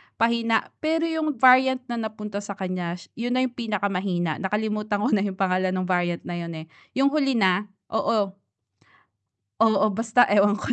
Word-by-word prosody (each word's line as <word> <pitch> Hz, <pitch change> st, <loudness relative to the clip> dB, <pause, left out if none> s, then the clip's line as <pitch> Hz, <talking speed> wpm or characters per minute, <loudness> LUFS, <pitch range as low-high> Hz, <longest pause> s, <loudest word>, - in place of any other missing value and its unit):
pahina. 230 Hz, -1 st, +1 dB
Pero 325 Hz, +1 st, 0 dB
yung 315 Hz, -2 st, -1 dB
variant 260 Hz, 0 st, +6 dB
na 235 Hz, -, -3 dB
napunta 210 Hz, -2 st, -5 dB
sa 200 Hz, 0 st, -6 dB
kanya 185 Hz, -3 st, -3 dB
sh 175 Hz, -, -14 dB
'yun 245 Hz, +1 st, -2 dB
na 255 Hz, -, +2 dB
yung 255 Hz, -, -1 dB
pinakamahina, 195 Hz, -6 st, -1 dB
nakalimutan 210 Hz, +1 st, -2 dB
ko -, -, +2 dB
na 200 Hz, -2 st, +2 dB
yung 190 Hz, -2 st, -3 dB
pangalan 185 Hz, 0 st, +1 dB
nung 185 Hz, 0 st, -2 dB
variant 175 Hz, -1 st, 0 dB
na 175 Hz, -, -5 dB
yun, 170 Hz, -1 st, -6 dB
eh. 160 Hz, 0 st, -8 dB, 0.3 s
Yung 275 Hz, +1 st, +3 dB
huli 275 Hz, -3 st, +1 dB
na, 195 Hz, -1 st, +2 dB, 0.3 s
oo. 210 Hz, -3 st, +1 dB, 1.3 s
Oo, 215 Hz, -2 st, +4 dB
basta 225 Hz, +3 st, +3 dB
ewan 205 Hz, 0 st, +4 dB
ko 245 Hz, -, -2 dB
210 Hz, 175 wpm, -24 LUFS, 185-235 Hz, 1.3 s, variant